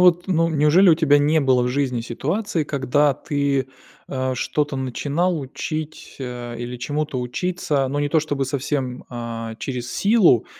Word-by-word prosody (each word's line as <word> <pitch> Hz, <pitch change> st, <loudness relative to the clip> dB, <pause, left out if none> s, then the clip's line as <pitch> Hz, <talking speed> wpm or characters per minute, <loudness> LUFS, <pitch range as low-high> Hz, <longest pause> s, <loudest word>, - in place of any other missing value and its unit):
вот, 175 Hz, -1 st, +5 dB
ну, 165 Hz, -3 st, +2 dB
неужели 160 Hz, +5 st, +5 dB
у 165 Hz, -, +8 dB
тебя 150 Hz, -3 st, +4 dB
не 150 Hz, +2 st, +3 dB
было 130 Hz, -3 st, +3 dB
в 125 Hz, -, 0 dB
жизни 130 Hz, -2 st, 0 dB
ситуации, 160 Hz, -, -2 dB
когда 145 Hz, +1 st, +2 dB
ты, 140 Hz, -1 st, -1 dB, 0.4 s
а, 130 Hz, -1 st, -1 dB
что-то 150 Hz, +2 st, -1 dB
начинал 145 Hz, +7 st, -1 dB
учить, 155 Hz, +3 st, -6 dB
а, 120 Hz, -2 st, -6 dB
или 120 Hz, +1 st, -5 dB
чему-то 145 Hz, +1 st, -2 dB
учиться, 145 Hz, +1 st, -1 dB
но 145 Hz, +2 st, -1 dB
не 145 Hz, -, 0 dB
то 160 Hz, -, +3 dB
чтобы 145 Hz, -3 st, -1 dB
совсем, 130 Hz, -1 st, -2 dB
а, 115 Hz, -1 st, -5 dB
через 125 Hz, -1 st, -5 dB
силу, 200 Hz, -, +4 dB
140 Hz, 160 wpm, -22 LUFS, 125-155 Hz, 0.4 s, у